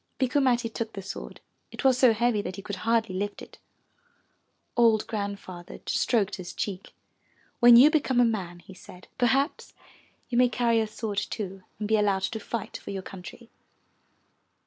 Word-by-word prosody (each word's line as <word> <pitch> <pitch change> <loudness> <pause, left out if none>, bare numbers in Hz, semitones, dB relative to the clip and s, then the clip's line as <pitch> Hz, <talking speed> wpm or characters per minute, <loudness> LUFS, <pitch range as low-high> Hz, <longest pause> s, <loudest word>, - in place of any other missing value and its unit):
Bikku 265 +2 +1
Matti 245 -3 +2
took 225 0 -5
the 195 - -7
sword; 190 - -8 0.3
it - - -7
was 265 -1 +5
so 255 -3 +6
heavy 225 -1 +1
that 185 - -6
he 195 - -9
could 205 -1 -5
hardly 225 -3 0
lift 205 +2 -3
it. - - -13 1.2
Old 230 -3 +4
Grandfather 200 -4 -6
stroked 210 -4 +1
his 180 -2 -8
cheek. 195 -2 -5 0.6
"When 240 -1 +8
you 270 +6 +8
become 270 -5 +1
a 245 - +6
man," 185 -6 -3
he 190 - -13
said, 180 0 -14
"per 245 - +4
haps 275 +6 0 0.5
you 240 -1 0
may 250 -1 +5
carry 235 -2 +2
a 220 - 0
sword 215 -1 -3
too, 195 -3 -5 0.2
and 210 - -3
be 220 +1 +3
allowed 200 -2 +1
to 225 - -2
fight 225 0 -5
for - - -11
your 195 -1 -4
country. 195 +6 -11
220 Hz, 175 wpm, -27 LUFS, 195-240 Hz, 1.2 s, When